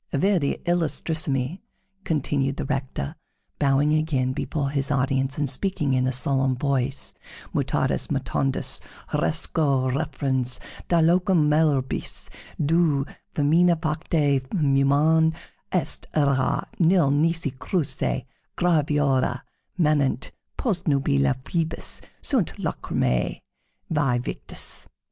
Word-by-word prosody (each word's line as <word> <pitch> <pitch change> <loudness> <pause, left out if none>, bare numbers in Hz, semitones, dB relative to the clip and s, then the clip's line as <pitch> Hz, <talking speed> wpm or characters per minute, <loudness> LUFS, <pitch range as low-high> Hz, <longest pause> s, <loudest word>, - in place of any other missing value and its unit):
"Viri 170 -1 +1
illustrissimi," 160 -3 -1 0.5
continued 140 -2 0
the - - -3
Rector, 130 - -3 0.5
bowing 140 +2 +3
again 145 -5 +1
before 140 0 -2
his 140 -1 0
audience 135 -1 0
and 145 -1 0
speaking 150 0 0
in 130 0 +2
a - - +1
solemn 130 +1 +2
voice: 135 0 -1 0.4
"_mutatis - - 0
mutandis, 135 0 -1 0.3
horresco 150 -3 +1
referens, 135 -4 -1 0.3
da 170 -1 +3
locum 175 -1 +3
melioribus, 150 -3 0 0.3
dux 150 -2 +2 0.2
femina 170 +4 +4
facti, 155 -3 0
humanum 155 +1 +3 0.4
est 180 - -1
errare, 140 -4 +2
nil 170 -4 +4
nisi 160 0 +1
cruce, 135 -2 -2 0.3
graviora 145 -6 +2 0.4
manent, 145 -5 +1 0.3
post 195 -8 -1
nubila 70 - +2
Phoebus, 165 -2 -2 0.2
sunt - - 0
lachrimae 60 -1 -1
rerum, - - -40 0.5
vae 145 -6 +2 0.2
victis_." - - -3
145 Hz, 100 wpm, -24 LUFS, 135-160 Hz, 0.5 s, femina